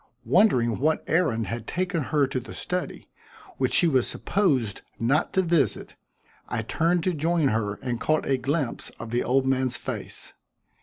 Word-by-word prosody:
Wondering 125 - +3
what 155 +4 +1
errand 130 -10 +1
had 115 -1 -5
taken 180 -4 -1
her 145 -1 +2
to 130 -1 -2
the 125 - -10
study, 180 0 -4 0.5
which - - +1
she 175 - +5
was 130 -6 +2
supposed 135 - 0 0.2
not 135 +8 +1
to 190 - +3
visit, 165 - 0 0.5
I 115 -2 -2
turned 165 +8 +1
to 185 - +1
join 160 -1 +1
her 105 -3 -1
and 120 -2 -3
caught 155 0 +1
a 135 - +1
glimpse 140 0 -2
of 115 -1 -7
the 120 +1 +1
old 130 +1 +2
man's 130 -1 +1
face. - - -6
135 Hz, 165 wpm, -26 LUFS, 120-170 Hz, 0.5 s, she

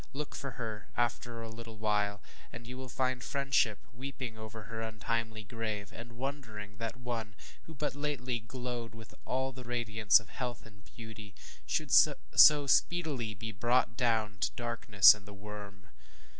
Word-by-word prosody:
Look 145 +1 -5
for 140 -1 -5
her, 110 -3 -5
after 120 -1 -1
a 115 - -6
little 115 0 -9
while, 105 -1 0 0.3
and 120 0 -9
you 130 +2 -7
find 130 0 -1
friendship 135 -6 +1
weeping 130 -1 -6
over 110 0 -8
her 110 +2 -6
untimely 110 0 -2
grave, 105 -2 -4
and 115 +1 -9
wondering 115 -7 -5
that 115 +2 -4
one, 115 -4 -4 0.3
who 160 - -10
but 145 +2 -2
lately 140 -4 -2
glowed 120 0 -6
with 110 0 -12
all 130 +1 -1
the 130 0 -9
radiance 110 -5 +3
of 110 -3 -15
health 120 -1 -5
and 105 -2 -16
beauty, 110 -3 -10 0.3
should - - -1
so 150 -1 +7
speedily 140 -7 +1
be 110 +3 -5
brought 120 +2 +2
down 110 -4 +1
to - - +1
ŌĆ£darkness 115 -5 +6
and 105 -1 -13
the 100 - -10
worm. 100 -1 -9
115 Hz, 155 wpm, -32 LUFS, 105-125 Hz, 0.3 s, so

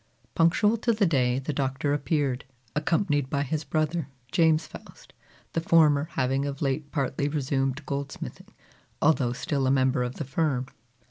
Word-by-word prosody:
Punctual 200 +7 +3
to 235 +1 +1
the 210 -2 +2
day 130 -7 +2
the 135 +3 -3
Doctor 135 +1 -1
appeared, 140 -3 0 0.3
accompanied 150 -3 +1
by 140 +1 0
his 150 +2 -2
brother, 155 0 -1 0.2
James 160 -1 +3
Faust; - - -13 0.4
the 165 - 0
former 155 -3 +4
having 135 +2 0
of 140 -1 -5
late 145 +1 -2
partly 140 -1 -1
resumed 135 -1 -1
goldsmithing, 140 0 -5 0.5
although 145 -6 +3
still 140 0 -1
a - - +3
member 130 -1 +2
of 125 0 -2
the 150 - -4
firm. 135 -2 0
145 Hz, 150 wpm, -27 LUFS, 135-160 Hz, 0.5 s, former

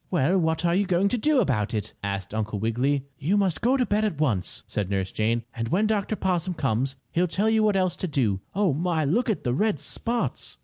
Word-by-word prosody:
"Well, 175 0 +2
what 160 0 0
are 170 - +3
you 195 +2 +2
going 185 +3 +2
to 245 - 0
do 295 +2 +3
about 120 - 0
it?" 105 - -3
asked 100 -1 -3
Uncle 110 -1 -2
Wiggily. 125 +6 0
"You 180 +9 +1
must 190 -5 +1
go 255 +3 +3
to 250 - +2
bed 210 0 +1
at 205 -9 -1
once," 110 -12 -1
said 100 -3 -3
Nurse 95 -1 -1
Jane, 115 +2 0
"and 115 -2 -3
when 195 - +2
Dr. 215 0 0
Possum 180 -2 -1
comes 135 -2 0 0.2
he'll 180 +2 +2
tell 205 +6 +1
you 220 0 +3
what 210 -2 +3
else 185 -2 +1
to 185 - -2
do. 115 - 0
Oh, 195 -6 +2
my! 160 +1 0
Look 230 - +1
at 200 -9 -1
the 120 - 0
red 210 - +1
spots!" 230 - -2
160 Hz, 230 wpm, -25 LUFS, -, 0.2 s, are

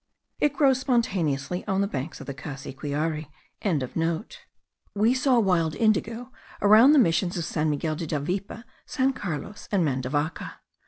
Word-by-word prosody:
It 295 -1 +2
grows 270 -3 +3
spontaneously 180 - 0
on 195 -1 +1
the 200 - +1
banks 145 -2 -5
of - - -9
the 140 - -5
Cassiquiare.) 145 +3 -4 1.7
We 215 +4 +3
saw 255 -1 +3
wild 175 -7 +1
indigo 225 +3 0 0.3
around 220 +7 +7
the - - +5
missions 180 -5 +2
of 170 - -2
San 155 -1 -1
Miguel 155 +1 -1
de 165 +1 -5
Davipe, 180 +9 -3 0.2
San 270 -1 +1
Carlos, 200 - -6
and 190 -5 +2
Mandavaca. 145 +3 -2
180 Hz, 140 wpm, -26 LUFS, 150-230 Hz, 1.7 s, around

